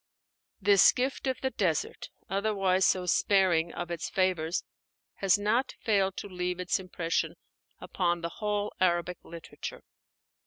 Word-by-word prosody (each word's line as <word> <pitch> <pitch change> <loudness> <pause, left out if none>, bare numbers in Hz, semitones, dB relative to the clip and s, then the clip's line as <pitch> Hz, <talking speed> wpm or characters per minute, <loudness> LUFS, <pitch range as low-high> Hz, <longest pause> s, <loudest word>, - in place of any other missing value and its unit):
This 200 -2 +6
gift 260 +1 -2
of 260 - -1
the 265 - -1
desert 170 - -1 0.2
otherwise 195 -2 +2
so 185 -1 +1
sparing 180 -3 +3
of 175 -1 -5
its 170 -2 -3
favors 180 -3 0 0.5
has 195 0 +3
not 220 +6 0
failed 195 -4 +1
to - - -5
leave 180 -1 -3
its 180 +1 0
impression 175 -3 -2 0.4
upon 175 -2 -1
the 170 - -3
whole 210 -1 -1
Arabic 175 -1 +1
literature. 170 0 -8
185 Hz, 130 wpm, -29 LUFS, 175-205 Hz, 0.5 s, This